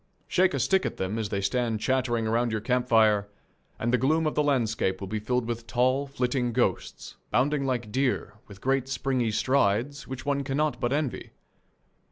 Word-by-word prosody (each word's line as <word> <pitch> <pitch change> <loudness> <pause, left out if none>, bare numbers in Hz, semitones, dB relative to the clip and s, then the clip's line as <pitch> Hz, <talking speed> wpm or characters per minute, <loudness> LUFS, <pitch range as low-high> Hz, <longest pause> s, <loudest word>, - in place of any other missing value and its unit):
Shake 185 -4 +2
a - - -1
stick 185 +11 +2
at - - -3
them 95 +4 -2
as 105 -2 -2
they 100 -1 -2
stand 115 +2 0
chattering 120 -1 0
about 115 +2 +1
your 110 -1 -1
camp 125 +3 0
fire, 110 -4 +4 0.5
and 120 +2 -1
the 125 - +4
gloom 155 +6 +2
of 155 - 0
the - - +2
landscape 115 -9 0
will 95 - -6
be 110 +3 -3
filled 125 +3 -1
with 115 -1 -4
tall, 130 +3 +1
flitting 125 -2 -1
ghosts, - - -2
bounding 140 +1 +1
like 120 -5 -2
deer, 130 -3 0
with 100 -1 -13
great 135 0 +1
springy 130 -3 0
strides 130 +3 +1
which 130 +1 -7
one 140 -1 0
cannot 145 +3 -1
but 120 - -1
envy. 145 -2 -2
125 Hz, 190 wpm, -27 LUFS, 110-135 Hz, 0.5 s, fire